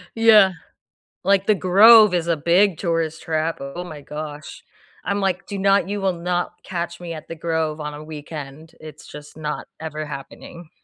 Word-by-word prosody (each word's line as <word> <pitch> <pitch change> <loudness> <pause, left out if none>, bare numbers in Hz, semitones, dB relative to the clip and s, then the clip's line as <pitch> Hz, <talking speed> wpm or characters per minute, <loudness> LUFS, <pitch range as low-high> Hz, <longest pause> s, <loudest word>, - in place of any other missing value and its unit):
Yeah. 215 -4 +6 0.7
Like, 195 +1 +2
The 215 - +4
Grove 210 +3 +7
is 170 -1 0
a 165 -2 +1
big 175 +3 +3
tourist 165 -3 -2
trap 160 +1 -2
oh 140 +6 -6
my 155 -5 -9
gosh. 150 0 -8 0.4
I'm 200 +2 -1
like, 190 -2 -2
"Do 200 - -5
not" 195 -1 +2
you 205 0 -2
will 190 -2 0
not 175 +1 -2
catch 170 -1 -5
me 170 -1 -6
at 155 - -9
the - - -6
Grove 160 -1 -2
on 150 0 -5
a 150 - -9
weekend, 150 0 -9
it's 155 -1 -12
just 150 0 -12
not 150 -1 -5
ever 155 -1 -5
happening. 150 +4 -10
170 Hz, 175 wpm, -21 LUFS, 155-190 Hz, 0.7 s, Grove